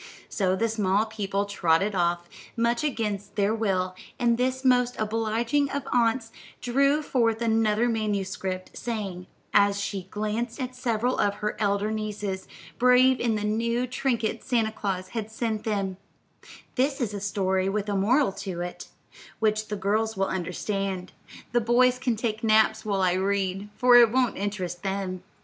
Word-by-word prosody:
So 185 -2 +1
the 230 +4 +1
small 210 -1 +1
people 205 -2 -2
trotted 195 0 +1
off, 175 -1 0 0.3
much 235 +3 +1
against 210 -7 -2
their 205 +1 +2
will, 190 -5 0 0.2
and 235 -1 +2
this 260 +2 -1
most 250 -1 +3
obliging 225 +6 0
of 280 -1 -4
aunts 230 -1 +2 0.3
drew 275 +5 +2
forth 230 -5 +1
another 225 0 +2
manuscript, 195 -4 -2
saying, 200 -6 -4 0.3
as 200 -1 +4
she 195 -2 -4
glanced 215 +5 -3
at 255 -1 -4
several 245 0 0
of 205 -1 +2
her 210 +1 -3
elder 205 0 +1
nieces, 210 -3 -4 0.3
brave 250 +1 +5
in 230 -2 +1
the 210 - -2
new 230 +3 0
trinkets 250 -3 -2
Santa 225 -3 +1
Claus 190 -3 -3
had 220 -2 -4
sent 220 -1 -3
them: 195 -4 -1 0.8
"This 270 +2 0
is 230 -5 -1
a 200 - -5
story 190 -1 0
with 205 +1 -2
a 205 - -1
moral 235 +6 +3
to 190 -2 -6
it, 175 0 -6 0.5
which 215 -1 +1
the 210 - -3
girls 215 +2 0
will 195 - +2
understand; 190 +1 -3 0.4
the 240 0 +2
boys 250 +2 +3
can 250 -3 0
take 220 0 -3
naps 220 0 +3
while 200 -2 0
I 180 -1 +3
read, 195 +1 -1
for 250 -1 +5
it 235 -2 +7
won't 255 -1 +2
interest 185 -4 -3
them." 190 -2 -3
215 Hz, 160 wpm, -26 LUFS, 195-235 Hz, 0.8 s, it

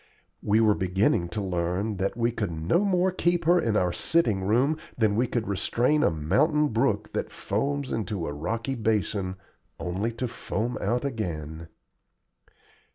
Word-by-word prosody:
We 105 +2 +2
were 110 -2 +5
beginning 95 -2 +1
to 105 +3 -3
learn 95 +3 -1
that 95 +4 -2
we 115 0 +1
could 110 -4 -2
no 80 - +1
more 190 -2 +2
keep 175 -2 0
her 175 +2 +5
in 110 -7 +1
our 90 -3 +1
sitting 115 -13 +2
room 125 +10 +2 0.2
than 110 -3 +2
we 120 +3 +2
could 115 -1 -2
restrain 120 +9 +1
a - - +4
mountain 140 - +2
brook 110 -2 0
that - - -3
foams 140 +6 -2
into 100 -5 -2
a 75 - -4
rocky 115 - -3
basin 105 -5 -1 0.4
only 95 +6 -2
to 125 +2 -3
foam 115 +1 -3
out 125 +3 0
again. 85 - -4
110 Hz, 160 wpm, -26 LUFS, 95-130 Hz, 0.4 s, were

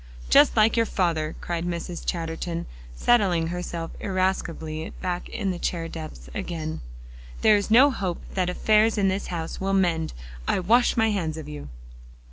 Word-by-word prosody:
"Just - - +6
like 215 +1 +5
your 230 -1 +2
father," 165 -5 0
cried 170 -1 -3
Mrs. 175 0 -4
Chatterton, 165 0 -3 0.3
settling 180 - +3
herself 170 -1 -4
irascibly 175 -5 -2
back 180 -1 -3
in 200 -4 -2
the 175 - -5
chair 165 -2 -2
depths 155 - -8
again. 160 - -4 0.6
"There 215 -1 +6
is 205 0 0
no 260 +6 +7
hope 185 -8 -3
that 185 -2 0
affairs 215 +4 +3
in 195 -2 +3
this 190 +1 -2
house 165 -1 -4
will 195 0 0
mend. 175 -4 +1 0.3
I - - +2
wash 235 +8 +3
my 225 -1 +3
hands 165 -6 -2
of 155 -2 -7
you." 150 - -8
175 Hz, 160 wpm, -25 LUFS, 165-200 Hz, 0.6 s, no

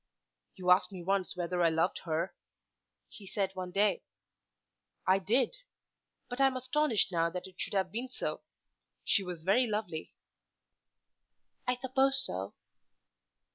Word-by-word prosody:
"You 180 -1 +1
asked 185 +3 +5
me 185 -3 -7
once 195 0 0
whether 175 0 -1
I 170 - +5
loved 165 +3 +1
her," 165 +2 -1 0.7
he 200 - -12
said 195 0 -1
one 185 -1 -5
day. 200 +3 +2 1.0
"I 190 +1 +4
did; 240 - +1 0.7
but 245 +2 -3
I 270 - +7
am 260 -1 -1
astonished 255 -5 +1
now 165 -1 +2
that 180 +1 -5
it 185 -1 -9
should - - -2
have 190 -2 +1
been 240 +5 -3
so. - - -4 0.6
She - - +3
was 180 -4 -5
very 235 +8 +4
lovely." 205 -7 -3 1.5
"I 250 - +3
suppose 265 +2 +2
so." 95 - -2
195 Hz, 140 wpm, -32 LUFS, 180-245 Hz, 1.5 s, I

